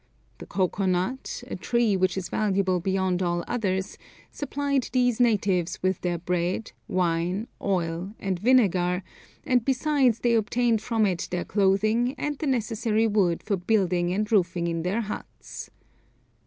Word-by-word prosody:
The - - -9
cocoa 190 0 0
nut, 245 - -2
a - - -5
tree 235 -4 +1
which 185 0 +1
is 185 - -3
valuable 195 -3 +1
beyond 190 0 0
all 175 -1 0
others, 190 -4 -2 0.3
supplied 280 -2 -1
these 245 -2 +2
natives 195 -7 +2
with 185 -1 0
their 175 -1 -1
bread, 180 +4 -2 0.2
wine, 180 +4 0
oil, 180 +1 -2
and 190 -3 -2
vinegar, 190 -6 +3 0.4
and 250 -5 +2
besides 265 -2 +2
they 240 -1 +2
obtained 230 0 +2
from 225 -1 +1
it 180 -4 -1
their 180 -1 -2
clothing 215 +5 +2
and 295 0 -2
the 310 - -2
necessary 225 -3 +1
wood 200 -6 +1
for 200 -3 0
building 180 -2 +1
and 210 +3 -1
roofing 175 -4 +2
in 165 -1 -1
their 190 +7 0
huts. 210 -1 -7
200 Hz, 145 wpm, -26 LUFS, 180-235 Hz, 0.4 s, vinegar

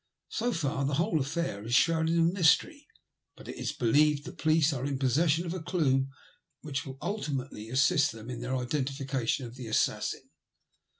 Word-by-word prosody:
So 245 +2 -1
far 145 - -1
the 140 +1 0
whole 165 +1 +1
afiair 140 -7 -2
is 115 +2 0
shrouded 165 +3 +3
in 165 +1 +3
mystery, 240 - +2 0.5
but, - - -13
it - - -6
is - - -2
believed, 145 +4 +2
the - - -6
police 155 -1 +2
are 130 -2 -4
in 140 -1 -1
possession 150 +6 +2
of 170 - -3
a 185 - -5
clue 135 -6 +1 0.5
which 145 -2 -4
will 135 0 -8
ultimately 135 - -4
assist 140 +4 +3
them 115 0 -11
in 120 -1 -6
their 125 +2 -2
identification 135 -1 -2
of 115 - -9
the 125 -2 -8
assassin. 110 - -1
140 Hz, 175 wpm, -29 LUFS, 130-165 Hz, 0.5 s, shrouded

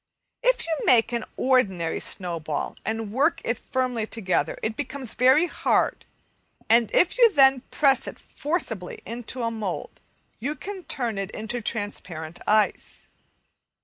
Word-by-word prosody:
If - - +2
you 330 - -1
make 230 -2 +5
an 235 -2 -1
ordinary 190 -11 +2
snowball 165 -5 -2
and 220 -1 -3
work 285 +8 +2
it 230 0 -1
firmly 250 -4 -1
together, 195 -6 -1
it 220 0 -1
becomes 265 -3 -5
very 260 +6 +5
hard, - - 0 0.6
and 230 -1 +4
if 360 +7 +3
you 470 -2 +7
then 270 -5 +5
press 275 -3 +2
it - - -7
forcibly 235 - -3
into 240 +3 -4
a 230 - 0
mould 215 -5 -5 0.4
you 280 +7 -2
can 385 -1 -7
turn 235 -7 -2
it 195 -1 -3
into 230 +3 -4
transparent 180 -7 -4
ice. 215 0 +1
235 Hz, 140 wpm, -25 LUFS, 210-270 Hz, 0.6 s, you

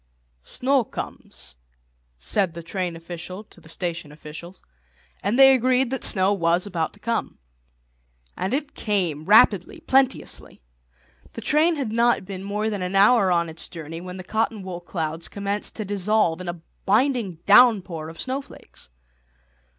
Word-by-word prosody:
"Snow 260 - 0
comes," 130 - -8 0.6
said 175 - -1
the 170 - -7
train 175 0 -3
official 175 +4 -8
to 175 - -18
the 160 - -16
station 170 -3 -4
officials; 155 +4 -11 0.6
and 205 +5 0
they 270 0 +8
agreed 255 0 +2
that 265 - -3
snow 190 -1 +3
was 170 -1 +1
about 170 -5 -2
to 205 - -18
come. 230 +2 -2 1.0
And 190 - -3
it 280 +2 -2
came, 175 -8 -1
rapidly, 200 -2 +4
plenteously. 265 - 0 0.7
The - - -7
train 310 +7 +3
had 270 -7 -3
not 235 -2 +2
been 190 -1 -7
more 210 +2 -2
than 205 -3 -3
an 180 +1 -3
hour 200 -1 +5
on 170 -1 +2
its 160 0 -6
journey 165 -1 -7
when 180 +1 -8
the 185 - -7
cotton 220 +1 -1
wool 180 -2 -6
clouds 165 -2 -4
commenced 200 +1 -3
to 215 - -4
dissolve 200 -3 +1
in 180 - -5
a 175 0 -5 0.3
blinding 230 -3 +2
downpour 200 -8 +5
of 165 - -12
snowflakes. 265 - -7
195 Hz, 150 wpm, -23 LUFS, 170-230 Hz, 1.0 s, they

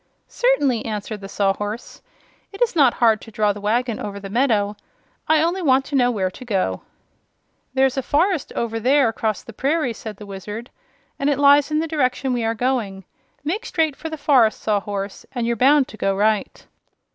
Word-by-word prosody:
"Certainly," 285 - +1
answered 210 -1 -5
the 195 - -8
Sawhorse. 205 +3 -2 0.5
"It 395 - -11
is 460 - -1
not 275 -6 +4
hard 225 -3 +3
to - - -11
draw 210 -1 +1
the 205 - -9
wagon 230 +2 0
over 200 -1 -5
the 195 -1 -8
meadow. 215 -4 +1 0.5
I 315 0 +4
only 350 +3 0
want 270 -4 +3
to 290 - -4
know 245 -2 +4
where 190 -6 -1
to 255 - -11
go." 190 - -1 0.9
"There's 265 0 +2
a - - +1
forest 320 +4 0
over 225 -1 -2
there 260 +2 +3
across 220 -1 -2
the 230 - -11
prairie," 275 +1 0
said 215 -2 -8
the 210 - -10
Wizard, 205 +4 -7 0.5
"and 275 - +1
it 285 - +1
lies 285 0 +5
in 305 0 +1
the 325 - -2
direction 265 -3 0
we 240 -2 -1
are 225 0 0
going. 220 -6 -2 0.4
Make 370 +10 -2
straight 320 - 0
for 320 - -6
the 315 - -5
forest, 260 -7 +3
Sawhorse, 200 -1 -2
and 240 -2 -1
you're 235 0 0
bound 270 +3 +4
to 215 - -11
go 195 -2 0
right." 210 +1 0
240 Hz, 190 wpm, -21 LUFS, 210-285 Hz, 0.9 s, lies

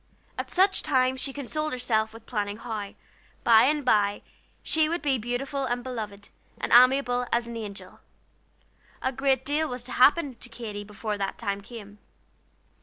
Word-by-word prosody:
At - - -5
such 385 +2 +3
times 260 -3 +1
she 275 - -2
consoled 305 +3 -3
herself 220 -3 0
with 225 0 -13
planning 205 -3 -3
how, 215 -3 -6 0.5
by 225 -1 +7
and 295 0 +1
by, 205 -4 +2 0.4
she 315 -1 +2
would 340 +1 -2
be 270 -4 +1
beautiful 265 +4 -2
and 245 -1 -2
beloved, 215 -5 -6 0.3
and - - -2
amiable 250 0 +5
as 235 0 +1
an 235 0 -7
angel. 200 -4 -8 1.0
A 260 - +1
great 265 0 +1
deal 305 +2 +1
was 250 -1 -4
to 250 - -10
happen 280 +3 +4
to 245 - -10
Katy 220 -3 -6
before 210 0 -5
that 195 -1 -2
time 200 -3 -3
came. 205 -2 -11
245 Hz, 165 wpm, -27 LUFS, 215-270 Hz, 1.0 s, by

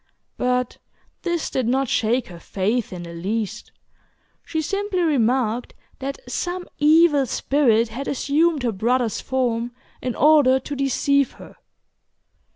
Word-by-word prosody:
But 250 0 -1 0.4
this 345 -3 -2
did 255 -3 -1
not 265 +2 +1
shake 235 +2 +1
her 175 -2 -10
faith 210 +7 -1
in 180 -2 -6
the 170 0 -9
least. 215 +6 -4 0.7
She 320 - -3
simply 395 +3 -1
remarked 250 -5 +1 0.2
that 275 +1 -4
some 355 0 -3
evil 300 -2 +5
spirit 235 -4 +2
had 260 +5 -6
assumed 295 +2 +1
her 240 - +1
brother's 230 +3 0
form 245 -2 -1 0.3
in 250 -2 -3
order 285 -3 +5
to 285 +2 -6
deceive 275 0 +1
her. - - -14
255 Hz, 130 wpm, -22 LUFS, 230-290 Hz, 0.7 s, evil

